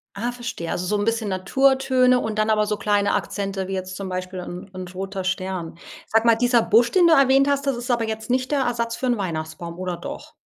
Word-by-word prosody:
Ah. 235 +5 -2
Verstehe. 240 -9 -5
Also 180 - -2
so 210 +3 0
'n 205 - -1
bisschen 225 -2 0
Naturtöne 255 +5 +3
und 220 -2 -3
dann 215 +1 +2
aber 215 -1 +3
so 210 - -1
kleine 205 -1 +1
Akzente 195 0 -2
wie 195 - -4
jetzt 185 0 -4
zum 195 -1 -5
Beispiel 185 0 -4
'n 180 +2 -8
'n 185 -1 -6
roter 190 +1 -5
Stern. 185 -3 -3 0.3
Sag 225 +1 +2
mal, 230 -1 +6
dieser 245 0 +3
Busch, 235 +2 +3
den 355 -2 +5
du 330 - +6
erwähnt 275 -1 +5
hast, 280 0 +1
das 270 - +1
ist 240 +1 -6
aber 235 -2 +1
jetzt 220 +1 -5
nicht 255 +2 0
der 285 - +2
Ersatz 235 -2 -1
für - - -4
'n 240 -2 +1
Weihnachtsbaum, 170 -2 -5
oder 180 -2 -3
doch? 175 - -8
215 Hz, 235 wpm, -23 LUFS, 185-245 Hz, 0.3 s, mal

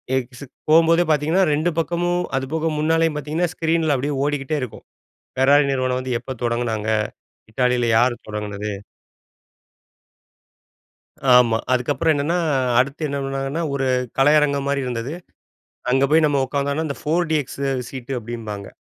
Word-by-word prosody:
X 125 +1 -4 0.3
போம்போதே 165 +2 +5
பார்த்தீங்கன்னா 155 +5 +2
2 155 +4 +1
பக்கமும் 175 +2 0
அதுபோக 155 +5 -1
முன்னாலையும் 160 0 +2
பார்த்தீங்கன்னா 155 +4 -1
ஸ்க்ரீனில 160 -2 +1
அப்டியே 140 +3 -2
ஓடிக்கிட்டே 145 0 -1
இருக்கும். 125 -4 -7 0.5
ஃபெராரி 140 +3 +5
நிறுவனம் 130 -1 0
வந்து 130 -1 -2
எப்போ 130 - -7
தொடங்குனாங்க? 115 -2 -1 0.6
இட்டாலில 125 -1 +1
யார் 120 +2 +3
தொடங்கினது? 105 0 -4 2.7
ஆமா. 120 -2 +5 0.2
அதுக்கு 125 +2 0
அப்பறம் 160 +4 +2
என்னன்னா, 155 +5 0 0.4
அடுத்து 140 +4 0
என்ன 140 0 -3
பண்ணாங்கன்னா? 135 +3 -3
ஒரு 135 -1 -1 0.3
கலையரங்கம் 140 -1 +3
மாரி 140 -1 0
இருந்தது. 125 +3 -4 0.8
அங்க 135 +1 +3
போயி 160 +1 +5
நாம 145 -2 +2
உட்கார்ந்தம்ன்னா 140 +3 -1
அந்த 140 - -5
போர் 165 +2 0
டிஎக்ஸ் 145 -3 -1 0.3
சீட் 130 -1 -9
டு 135 - -1
அப்டிபாங்க. 110 -3 -6
140 Hz, 130 wpm, -21 LUFS, 125-155 Hz, 2.7 s, போம்போதே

